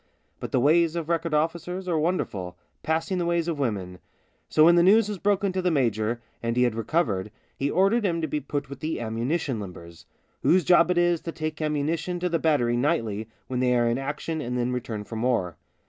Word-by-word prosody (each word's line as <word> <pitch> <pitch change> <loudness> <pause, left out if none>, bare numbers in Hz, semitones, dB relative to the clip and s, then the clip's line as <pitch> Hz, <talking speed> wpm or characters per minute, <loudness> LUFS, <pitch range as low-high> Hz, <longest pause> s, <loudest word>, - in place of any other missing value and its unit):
But - - -6
the 130 - +2
ways 160 +5 +3
of 165 -2 -3
record 165 -1 0
officers 170 +4 -2
are 165 -3 +1
wonderful 105 - -2
— - - -46
passing 165 +4 -1
the 175 - 0
ways 170 -1 0
of 165 -4 -2
women. 95 -8 -2 0.5
So 155 - +5
when 170 - +7
the 175 - +5
news 205 +4 +5
was 205 -3 -4
broken 200 0 +1
to 185 - -1
the 180 - +1
major, 120 - 0 0.2
and 115 +1 -2
he 125 - +4
had 120 -2 +2
recovered, 110 - -1 0.3
he 140 - -1
ordered 195 +8 +2
him 170 -4 0
to 160 - -1
be 150 +1 -2
put 145 0 -4
with 140 0 -9
the 155 +2 -3
ammunition 120 +4 -2
limbers, 85 -4 -10 0.4
whose 185 0 +4
job 175 -1 +5
it 180 - +1
is 175 -1 +2
to 165 - -5
take 155 -1 -5
ammunition 155 +4 -1
to 180 +1 -1
the 165 -1 0
battery 125 -7 +2
nightly 115 -6 -1 0.2
when 125 -1 -3
they 125 -1 +2
are 120 0 +2
in 120 +2 0
action 150 +3 -3
and 125 -2 -3
then 125 0 0
return 115 -4 -4
[for 110 +2 -7
more. 110 -8 0
150 Hz, 220 wpm, -26 LUFS, 120-170 Hz, 0.5 s, when